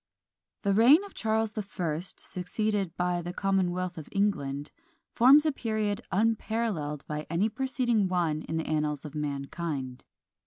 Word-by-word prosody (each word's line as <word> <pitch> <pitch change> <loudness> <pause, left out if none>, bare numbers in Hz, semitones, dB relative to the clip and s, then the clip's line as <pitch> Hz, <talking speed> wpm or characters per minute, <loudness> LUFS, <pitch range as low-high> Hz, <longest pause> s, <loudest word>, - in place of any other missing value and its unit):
The 200 -2 +2
reign 255 - +7
of 400 - -10
Charles 220 -1 0
the 215 - -3
First, 180 -4 -4
succeeded 195 0 -2
by 180 -1 0
the 175 +1 -5
Commonwealth 185 -2 0
of 155 - -10
England, 145 -8 -1 0.4
forms 275 +6 +7
a 310 - +3
period 220 -4 -1
unparalleled 215 -8 0
by 150 0 -4
any 175 +7 +1
preceding 240 -3 0
one 170 -4 0
in 160 - -4
the 160 - -2
annals 150 -1 -1
of 150 - -7
mankind. 140 -2 -4
185 Hz, 145 wpm, -29 LUFS, 155-220 Hz, 0.4 s, reign